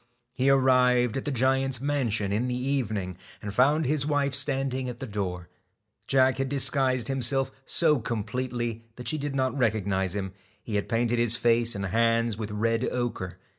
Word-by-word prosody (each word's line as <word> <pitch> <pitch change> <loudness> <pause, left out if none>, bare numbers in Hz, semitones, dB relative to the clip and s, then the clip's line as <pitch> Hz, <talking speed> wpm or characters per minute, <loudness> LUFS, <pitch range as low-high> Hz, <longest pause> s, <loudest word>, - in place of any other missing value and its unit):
He 130 +1 +1
arrived 125 -3 +3
at 135 - -3
the 145 - -1
giant's 135 0 +1
mansion 120 -8 -1
in 110 +5 0
the 125 0 -2
evening, 110 -9 -2 0.2
and 100 -1 -6
found 145 +7 +3
his 145 +1 +1
wife 145 -1 0
standing 135 -2 -1
at 120 - -7
the 130 - -6
door. 95 -6 -4 0.6
Jack 130 0 +3
had 135 0 -1
disguised 130 -3 +2
himself 135 0 +1
so 155 -4 +3
completely 120 +1 -3
that 125 - -9
she 155 - 0
did 140 -1 -4
not 130 0 0
recognise 100 -6 0
him. 95 -2 -4 0.3
He 110 - -7
had 100 -1 -1
painted 120 0 +1
his 120 -1 +2
face 115 0 +2
and 100 0 -3
hands 115 +2 +1
with 110 0 -5
red 115 +3 0
ochre. 105 -7 -3
125 Hz, 170 wpm, -27 LUFS, 110-135 Hz, 0.6 s, arrived